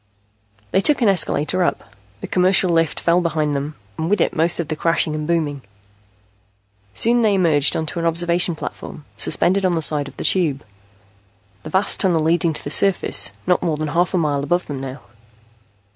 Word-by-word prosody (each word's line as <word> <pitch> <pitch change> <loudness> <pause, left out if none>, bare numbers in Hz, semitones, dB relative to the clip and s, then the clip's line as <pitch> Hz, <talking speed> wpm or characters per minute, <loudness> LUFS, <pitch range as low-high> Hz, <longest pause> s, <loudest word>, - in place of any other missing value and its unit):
They 190 - +2
took 285 +2 +2
an 215 - +4
escalator 180 -1 +2
up. - - -3 0.3
The - - -6
commercial 185 0 +3
lift 165 -2 0
fell 175 +1 +2
behind 155 -3 -1
them, 145 +2 -4 0.2
and 160 +1 -2
with 205 0 +1
it - - 0
most 165 +2 +2
of 170 - -3
the 155 - -3
crashing 165 -1 0
and 155 0 -4
booming. 155 -5 -1 1.3
Soon 240 +1 +2
they 215 -3 +2
emerged 160 -6 +2
on 160 - -3
an 170 -1 -3
observation 170 +1 0
platform, 150 -1 -8
suspended 195 +2 +1
on 180 -2 +1
the 165 - -1
side 150 -2 +1
of - - -14
the - - -5
Tube, 155 -7 +1 1.0
the - - -9
vast 190 +5 +1
tunnel 175 -5 +1
leading 170 +1 +1
to 155 - -5
the 145 - -5
surface, 195 +2 +3
not 180 -1 +1
more 160 -3 -1
than 155 0 -3
half 175 +3 0
a - - +2
mile 145 -4 0
above 175 +5 -1
them 140 -3 -6
now. 135 +1 -8
165 Hz, 190 wpm, -19 LUFS, 150-180 Hz, 1.3 s, an